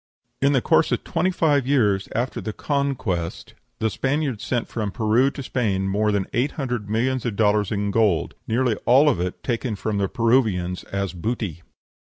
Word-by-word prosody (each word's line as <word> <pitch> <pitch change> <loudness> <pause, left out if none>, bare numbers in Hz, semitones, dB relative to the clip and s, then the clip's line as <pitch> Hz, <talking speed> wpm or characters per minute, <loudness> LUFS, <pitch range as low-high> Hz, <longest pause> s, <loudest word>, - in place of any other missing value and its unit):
In 140 +1 +4
the 130 - +2
course - - +3
of - - 0
twenty 175 +3 0
five 150 -7 +2
years 105 -8 +2
after 120 +3 -1
the 110 - -4
Conquest 130 - -2 0.2
the 110 - 0
Spaniards 135 - -1
sent 120 +2 -1
from 110 -3 -3
Peru 115 +5 +2
to 140 -1 -7
Spain 100 -7 -1
more 105 +2 +1
than 100 -2 0
eight 125 +5 0
hundred 125 -7 -3
millions 125 +4 0
of 115 -4 -2
dollars 105 -1 +2
of 100 -1 -1
gold, 105 -6 +2
nearly 120 +1 +1
all 135 +5 +6
of 125 - 0
it 90 0 -4
taken 120 -2 -2
from 105 0 -2
the 100 -2 0
Peruvians 110 -7 +1
as 100 -1 -3
"booty." 90 -3 -3
115 Hz, 180 wpm, -23 LUFS, 100-130 Hz, 0.2 s, all